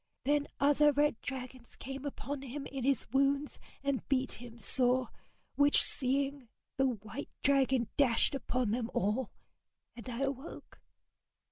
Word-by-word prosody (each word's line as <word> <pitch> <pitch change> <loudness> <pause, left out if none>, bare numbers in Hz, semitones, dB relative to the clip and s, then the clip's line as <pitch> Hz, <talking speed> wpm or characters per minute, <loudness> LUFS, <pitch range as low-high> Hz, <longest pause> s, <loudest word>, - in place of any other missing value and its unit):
Then 290 +1 +2
other 290 +1 +5
red 290 -4 +1
dragons 255 -2 -7
came 270 +2 -7
upon 285 0 -4
him 275 +1 -6
in 270 -2 -5
his 270 -2 +2
wounds 275 +2 +1 0.2
and 280 -2 0
beat 265 -1 +1
him 240 -1 -10
sore, 250 +1 +2 0.4
which 285 0 +4
seeing, 275 -1 -1 0.3
the 270 0 +3
white 225 +3 -5
dragon 265 -4 +3
dashed 255 -4 +4
upon 250 -4 -1
them 230 0 -1
all 210 +6 0 0.7
and 240 +1 -8
I 240 +1 -4
awoke. 275 +2 -5
265 Hz, 135 wpm, -32 LUFS, 245-280 Hz, 0.7 s, other